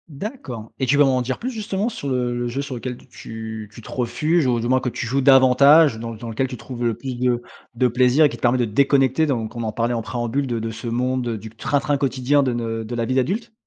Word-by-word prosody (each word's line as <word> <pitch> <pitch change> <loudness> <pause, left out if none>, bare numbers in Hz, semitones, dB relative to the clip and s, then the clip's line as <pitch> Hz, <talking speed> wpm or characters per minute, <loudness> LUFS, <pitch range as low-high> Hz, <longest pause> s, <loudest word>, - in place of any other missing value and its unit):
D'accord 140 - -7
et 130 - +1
tu 145 +3 +3
veux 145 - +6
m'en 130 -2 +2
dire 125 +1 -2
plus, 255 - -3
justement, 210 -2 -2
sur 145 - -4
le 125 -2 -1
le 120 0 -2
jeu, 125 +4 -3
sur 140 -2 -5
lequel 125 +1 -5
t - - -19
tu 110 -3 -8
tu - - -11
te - - -13
refuges, 150 +6 0
ou 120 -2 +1
du 115 - -2
moins, 130 +1 +3
que 130 - -1
tu 120 - -5
joues 135 +4 0
davantage 135 +1 +6
dans 115 0 -5
dans 115 +2 -9
lequel 125 +4 -1
tu 125 -1 -7
trouves 120 +1 -7
le 115 -2 +1
plus 125 +3 -6
de 120 -1 0 0.3
de 125 +2 +3
plaisir 125 +5 +4
et - - +4
qui - - -7
te - - -15
permet 120 +1 +3
de 125 - +1
déconnecter, 135 +5 +2
dont 120 -7 -1
on 120 - -3
en 110 - -2
parlait 115 +2 -1
en 115 - -1
préambule, 120 +4 -2
de 120 -2 -2
de 115 +1 -3
ce 115 +2 -7
monde, 125 +1 -1
heu, 115 - -2
du 110 +2 -9
train-train 145 +6 -1
quotidien 140 +1 +1
de 130 - 0
ne 115 -1 -3
de 115 +2 -6
la 115 -1 -1
vie 130 - -1
d'adulte? 195 - -1
125 Hz, 270 wpm, -22 LUFS, 115-140 Hz, 0.3 s, veux